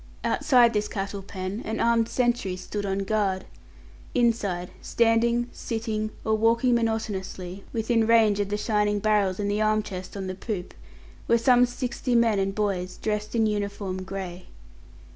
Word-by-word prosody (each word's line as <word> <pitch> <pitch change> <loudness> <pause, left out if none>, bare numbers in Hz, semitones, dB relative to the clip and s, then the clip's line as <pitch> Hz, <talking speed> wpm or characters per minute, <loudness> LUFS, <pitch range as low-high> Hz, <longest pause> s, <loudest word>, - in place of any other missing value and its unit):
Outside 245 -5 +4
this 210 0 0
cattle 200 0 -4
pen 190 +2 -5
an 220 +1 -3
armed 230 -1 +2
sentry 240 -7 0
stood 205 +2 -5
on 195 0 -1
guard; 195 -3 0 0.7
inside, 210 -7 +1
standing, 235 +1 +2
sitting, 220 -2 -3 0.2
or 220 - +2
walking 230 +3 +3
monotonously, 200 -5 -2
within 225 0 +1
range 220 -3 +4
of 200 -1 0
the 205 - -1
shining 210 -1 +1
barrels 205 -2 +1
in 205 - -1
the 205 +1 0
arm 215 0 +2
chest 185 -1 -7
on 195 - -4
the 185 - -3
poop, 190 -1 -5 0.5
were 235 - +5
some 245 +1 +5
sixty 245 0 -2
men 230 -3 +4
and 195 0 -1
boys, 190 -4 -1
dressed 210 +1 -3
in 225 -1 +3
uniform 200 -3 -2
grey. 185 -1 -6
210 Hz, 155 wpm, -26 LUFS, 195-230 Hz, 0.7 s, were